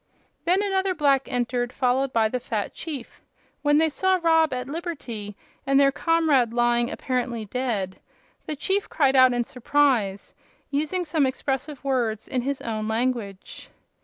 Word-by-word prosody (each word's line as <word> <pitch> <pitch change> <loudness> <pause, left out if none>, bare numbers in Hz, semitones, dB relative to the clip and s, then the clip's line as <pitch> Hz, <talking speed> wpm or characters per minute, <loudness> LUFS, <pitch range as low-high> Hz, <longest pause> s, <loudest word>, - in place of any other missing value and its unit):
Then 370 +4 +3
another 385 -2 0
black 275 -3 +2
entered, 245 0 -1
followed 260 +1 +1
by 225 -2 +3
the 250 +3 -2
fat 220 -4 -3
chief. 290 -7 -7 0.4
When 290 0 +3
they 320 +1 +3
saw 375 +5 +1
Rob 325 -2 +3
at 250 0 -3
liberty, 270 - -6 0.3
and 275 0 +4
their 275 0 +5
comrade 300 -7 +2
lying 240 0 +2
apparently 245 -5 -2
dead, 210 -5 -3 0.5
the 305 - -3
chief 385 +8 -1
cried 275 -3 +2
out 255 -1 +7
in 245 0 0
surprise, 245 -6 0 0.4
using 310 +6 -1
some 300 -3 +2
expressive 270 +2 -3
words 240 -6 -1
in 255 - -1
his 275 +2 -3
own 215 -2 -3
language. 220 -4 -3
260 Hz, 150 wpm, -25 LUFS, 240-300 Hz, 0.5 s, out